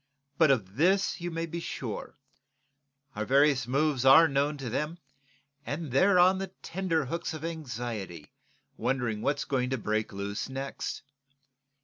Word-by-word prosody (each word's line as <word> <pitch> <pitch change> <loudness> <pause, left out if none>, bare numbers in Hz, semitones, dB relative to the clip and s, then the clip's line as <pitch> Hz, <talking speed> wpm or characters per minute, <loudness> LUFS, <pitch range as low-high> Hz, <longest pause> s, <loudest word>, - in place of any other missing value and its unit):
But 160 -3 +6
of 105 -6 0
this 190 +4 +2
you 175 - -3
may 165 0 -3
be 165 +1 -5
sure; 125 -8 -6 1.0
our 105 - -2
various 135 0 +3
moves 140 0 +1
are 135 +5 +8
known 145 +1 0
to 135 -2 -6
them, 150 +8 -2 0.7
and 150 -1 -4
they're 185 +8 +4
on 185 +2 +5
the 195 - -3 0.2
tenterhooks 165 -3 -2
of 155 +1 -6
anxiety 120 - -5 0.5
wondering 120 -3 -1
what's 145 +3 0
going 125 -2 0
to 130 - -1
break 110 -1 -1
loose 100 +3 -4
next. 135 +1 -5
140 Hz, 140 wpm, -29 LUFS, 120-165 Hz, 1.0 s, are